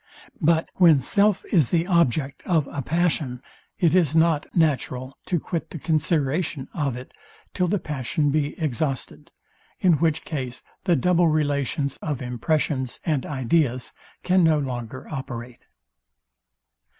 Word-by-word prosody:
But 165 +1 +2
when 165 -6 +6
self 200 +9 +2
is 155 - +4
the 170 -1 +1
object 155 -6 +1
of 160 -6 +2
a 145 - -3
passion, 150 -3 0 0.4
it 170 -3 +3
is 165 -5 +3
not 160 -2 +3
natural 135 -5 0
to 175 - +1
quit 165 +2 -4
the - - -7
consideration 155 -2 0
of 140 -6 -1
it, 125 - -10 0.4
till 180 -1 +1
the 205 +4 +1
passion 145 -1 -1
be 150 +1 -1
exhausted: 140 -2 -3 0.5
in 180 -2 +4
which 160 -1 +1
case 130 -5 -5 0.2
the 175 -3 +4
double 175 +4 +3
relations 145 -2 0
of 150 -5 -3
impressions 130 +1 -1
and 150 -5 0
ideas 130 -1 0 0.3
can 185 0 +3
no 160 -2 +4
longer 130 -3 -5
operate. 125 -4 -7
150 Hz, 135 wpm, -24 LUFS, 130-165 Hz, 0.5 s, when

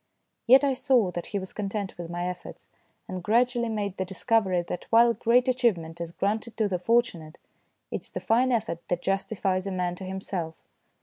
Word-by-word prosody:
Yet 265 +4 +8
I 275 -1 +3
saw 255 -7 +2
that 175 0 -5
he 205 - -3
was 190 -1 -6
content 200 -1 -3
with 170 -1 -7
my 175 +1 -3
efforts, 180 0 -8 0.4
and 185 -1 -5
gradually 235 +4 +2
made 205 -3 -3
the 190 - 0
discovery 190 -1 +1
that 175 +1 -6
while 235 +1 +6
great 240 +3 +3
achievement 185 -11 0
is 170 -1 -4
granted 215 +5 -2
to 220 -2 +2
the 185 -3 -2
fortu 230 -1 +2
nate, 155 +1 -12 0.5
it - - -3
is - - -13
the - - -5
fine 250 +3 +2
effort 220 -8 -1
that 175 0 -2
justifies 195 -1 -1
a - - -2
man 180 -1 -1
to 190 - -8
himself. 185 -3 -5
195 Hz, 195 wpm, -27 LUFS, 180-235 Hz, 0.5 s, Yet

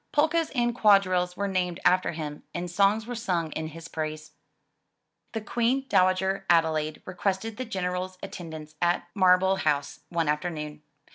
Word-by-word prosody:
Polkas 315 +2 +2
and 240 -1 +2
quadrilles 185 -5 +3
were 200 - 0
named 180 -2 -1
after 180 -1 +3
him 150 -2 -5
and 175 0 -3
songs 200 +4 +3
were 245 - -5
sung 180 -9 -1
in 160 +1 -3
his 165 +1 -9
praise. 155 -1 -5 1.0
The 225 - -2
Queen 240 +5 0
Dowager 190 0 +2
Adelaide 160 -2 +2
requested 190 +4 -2
the 255 - -3
General's 185 -3 -3
attend 165 -3 -7
ance 155 0 -9
at 175 0 +1
Marlborough 190 0 +4
House 145 -5 0
one 170 -2 0
afternoon. 150 -1 -2
180 Hz, 150 wpm, -27 LUFS, 160-200 Hz, 1.0 s, Marlborough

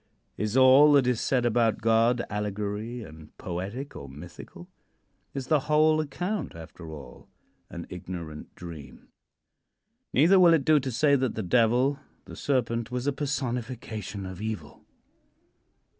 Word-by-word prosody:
Is 105 +4 -1
all 135 +3 +7
that 140 -3 +5
is 125 -2 +1
said 125 -3 +1
about 115 -1 +2
God 115 +2 +3
allegory, 105 +3 -4
and 80 -3 -14
poetic, 100 +11 -5
or 70 - -8
mythical? 85 +4 -11 0.7
Is 135 -2 -3
the 155 +2 +3
whole 155 +1 +4
account, 175 - -4
after 80 0 -10
all, 70 -5 -11 0.4
an 85 0 -7
ignorant 85 -4 -8
dream? 80 -6 -11 1.0
Neither 170 +8 +5
will 170 -2 +7
it 140 -4 -1
do 155 -1 +5
to 130 -1 -4
say 140 +4 +3
that 130 -3 -1
the 110 - -3
Devil 125 +7 +2 0.3
the - - -10
Serpent 115 -4 -1
was 125 +1 -3
a 145 - +1
personification 120 -8 -4
of 95 0 -8
evil. 110 -1 -6
115 Hz, 140 wpm, -27 LUFS, 95-135 Hz, 1.0 s, all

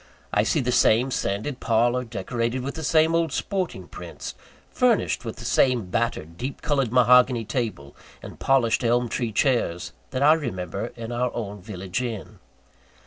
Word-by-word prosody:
I 105 - +4
see 140 +8 +1
the 125 0 0
same 120 +2 +4
sanded 110 +6 -2
parlour, 120 +2 +2
decorated 115 +2 -3
with 140 +1 -4
the 160 - -6
same 160 +2 +3
old 165 -2 +1
sporting 190 +4 -3
prints, - - -8 0.4
furnished 245 - +2
with 115 - -5
the 120 - -10
same 120 -6 +2
battered, 85 -8 -2
deep 135 +2 -5
coloured 135 -6 +1
mahogany 125 -1 +5
table, 105 - -3 0.3
and - - -10
polished 130 -3 +2
elm 120 +1 +2
tree 115 0 -2
chairs, 90 - 0 0.2
that 130 +1 -1
I 150 +2 +7
remember 100 - -3
in 115 0 -6
our 120 +1 0
own 105 -3 -5
village 95 +2 -4
inn. 115 -5 -6
120 Hz, 160 wpm, -24 LUFS, 110-130 Hz, 0.4 s, I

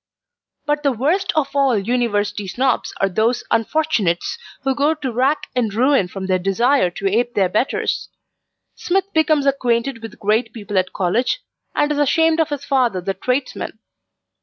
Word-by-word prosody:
But 295 0 0
the 280 -2 +2
worst 315 - 0
of 285 -2 0
all 270 -5 +3
University 205 -2 -1
Snobs 255 +5 0
are 195 - +3
those 220 +6 0
unfortunates 230 - 0 0.2
who 270 0 +1
go 290 +4 +2
to 280 -5 -4
rack 260 +6 +1
and 235 -4 +1
ruin 250 -1 +3
from 190 +1 -6
their 185 -1 +1
desire 210 +4 +2
to 195 +3 -3
ape 235 +4 0
their 190 -3 +2
betters. 215 +8 -1 0.6
Smith 385 +2 -1
becomes 310 -3 +3
acquainted 250 -2 0
with 225 -2 -9
great 220 +2 0
people 205 -3 -1
at 185 - -2
college, 240 - 0 0.3
and 295 - +2
is 295 - 0
ashamed 320 +3 +3
of 320 -1 +2
his 285 -1 -4
father 250 -8 +1
the 195 +2 -2
tradesman. 250 +3 -3
245 Hz, 160 wpm, -20 LUFS, 205-285 Hz, 0.6 s, all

